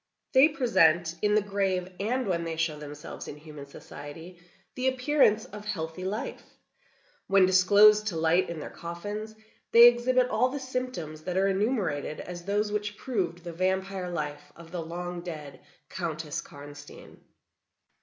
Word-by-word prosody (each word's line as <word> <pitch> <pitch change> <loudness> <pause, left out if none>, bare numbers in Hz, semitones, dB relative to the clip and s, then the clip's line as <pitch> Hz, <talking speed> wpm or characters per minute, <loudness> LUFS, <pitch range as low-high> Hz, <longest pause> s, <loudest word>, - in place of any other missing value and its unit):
They 270 +3 +7
present, 170 - +3
in 210 0 +3
the 215 - +3
grave, 195 -3 -1
and 245 +6 -1
when 175 -4 -1
they 165 -1 -3
show 160 -2 -1
themselves 150 0 -8
in 145 - -7
human 150 -2 -11
society, 160 +5 -11 0.3
the 255 0 -1
appearance 260 -4 +3
of 210 0 -10
healthy 185 -3 -4
life. 205 +4 -4 0.9
When 195 -1 +5
disclosed 205 +3 +6
to 185 - -2
light 165 +3 +2
in 170 -2 -5
their - - -7
coffins, 205 +6 -6 0.4
they 235 +1 +10
exhibit 250 +1 +3
all 250 +2 +2
the 285 +2 -4
symptoms 255 - -5
that 180 0 -2
are 195 +1 +3
enumerated 195 - -1
as 175 -1 -8
those 205 +1 0
which 210 0 -3
proved 180 -9 -3
the 170 -1 -6
vampire 190 +1 -1
life 150 -3 -5
of 165 -1 -13
the 175 -2 -3
long 175 +2 -5
dead 150 -6 -8 0.3
Countess 160 -4 -4
Karnstein. 145 0 -12
185 Hz, 155 wpm, -28 LUFS, 165-210 Hz, 0.9 s, they